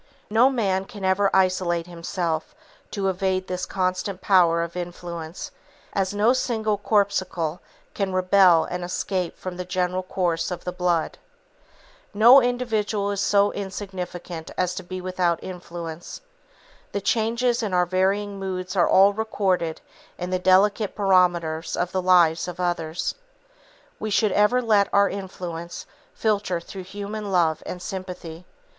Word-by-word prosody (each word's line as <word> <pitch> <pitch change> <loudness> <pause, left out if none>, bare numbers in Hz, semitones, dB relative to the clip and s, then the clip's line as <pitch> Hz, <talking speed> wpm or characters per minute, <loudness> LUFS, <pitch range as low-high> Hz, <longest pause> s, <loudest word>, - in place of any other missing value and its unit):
No 235 +5 +5
man 195 -7 0
can 205 -3 -7
ever 190 +1 +3
isolate 185 -3 +1
himself 170 -1 -3 0.3
to 195 -2 -2
evade 190 0 0
this 180 0 -4
constant 185 0 -2
power 175 -4 +4
of 170 +1 -7
influence, 175 -1 -6 0.4
as 195 -2 0
no 210 +4 +3
single 220 -4 0
corpuscle 185 -6 0 0.3
can 195 -2 -2
rebel 185 -2 +5
and 180 0 -5
escape 180 0 -2
from 185 -1 -6
the 180 - -3
general 180 0 -1
course 175 -3 -1
of 180 - -5
the 180 - -3
blood. 175 -2 -1 1.0
No 240 +6 +8
individual 220 -5 -1
is 200 -1 -2
so 200 0 +3
insignificant 180 -4 -6
as 180 -1 0
to 190 - -5
be 185 0 -7
without 180 -2 0
influence. 170 -2 -7 0.7
The 200 - -1
changes 235 +3 +1
in 215 -3 -2
our 180 -1 +3
varying 195 +3 0
moods 185 -1 -4
are 175 - +3
all 195 +2 +6
recorded 195 -6 -1 0.4
in 180 +1 -4
the 185 - 0
delicate 195 +3 +3
barometers 175 -5 +2
of 175 0 -1
the 185 - 0
lives 175 -3 +4
of 180 0 -7
others. 175 -2 -1 0.9
We 215 - -3
should 210 0 +2
ever 210 +6 +3
let 210 -3 +3
our 200 0 +4
influence 175 -3 -6 0.3
filter 205 -5 0
through 185 +2 -9
human 205 +2 -6
love 165 -4 +2
and 180 - -5
sympathy. 180 -2 -7
185 Hz, 140 wpm, -24 LUFS, 175-200 Hz, 1.0 s, No